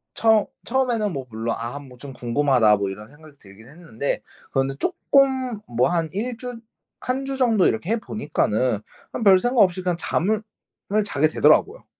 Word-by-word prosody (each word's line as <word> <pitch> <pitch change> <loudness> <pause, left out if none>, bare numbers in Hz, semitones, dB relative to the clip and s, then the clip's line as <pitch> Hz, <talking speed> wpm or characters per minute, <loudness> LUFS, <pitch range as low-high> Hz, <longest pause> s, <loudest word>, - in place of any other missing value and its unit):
처 220 -2 +3 0.2
처음에는 235 -6 0
뭐 135 -3 -5
물론 115 +1 -3
'아 120 +5 -5
뭐 135 -3 -13
좀 135 +2 -9
궁금하다.' 120 -3 +2
뭐 100 -1 -2
이런 105 +2 -8
생각이 150 +2 -17
들긴 105 +4 -16
했는데 145 -5 -4 0.3
그런데 135 0 0
쪼끔 260 - +1
뭐 120 +1 +1
한 165 -2 0
1 235 +5 -3
주 245 -1 -7 0.4
1 260 +2 -2
주 270 0 -3
정도 230 -7 +3
이렇게 160 - -1
해 230 - +2
보니까는 125 - -1 0.3
그냥 - - -4
별생각 220 +5 +5
없이 185 -1 +3
그냥 180 -1 0
잠을 210 +5 0 0.6
자게 155 -6 +1
되더라고요. 155 - +3
170 Hz, 315 characters per minute, -23 LUFS, -, 0.6 s, 별생각